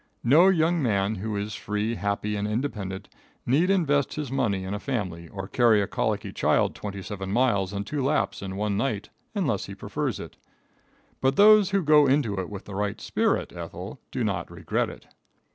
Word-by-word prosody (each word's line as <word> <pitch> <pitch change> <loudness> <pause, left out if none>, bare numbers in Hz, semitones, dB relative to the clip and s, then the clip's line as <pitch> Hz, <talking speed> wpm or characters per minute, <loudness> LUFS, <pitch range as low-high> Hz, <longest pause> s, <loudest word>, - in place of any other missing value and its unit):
No 150 +10 +6
young 170 -2 +2
man 100 -4 +1
who 105 +1 -3
is 100 +1 -3
free, 105 +2 -2
happy 105 0 -2
and 105 0 -1
independent, 105 -5 -3 0.4
need 155 +9 +3
invest 145 -8 +2
his 150 -4 -4
money 100 -8 0
in 95 +1 -4
a 105 - -3
family 95 -10 -3
or 95 +2 -7
carry 115 -1 +4
a 100 - +1
colicky 105 -1 -2
child - - +2
twenty 100 -2 -6
seven 95 -2 -5
miles 100 -5 +2
and 100 0 -3
two 140 +4 -2
laps 145 -4 0
in 95 -1 -5
one 105 0 -1
night 110 -5 -2 0.3
unless - - 0
he - - -8
prefers - - -3
it. - - -9 0.8
But 135 +1 +2
those 210 -1 +7
who 195 -1 +1
go 150 -1 +6
into 130 -8 +1
it 95 - -4
with 100 -2 -8
the 100 - -9
right 100 +1 -2
spirit, - - 0
Ethel, - - -7
do - - -2
not - - -2
regret - - -2
it. - - -12
105 Hz, 190 wpm, -26 LUFS, 100-140 Hz, 0.8 s, those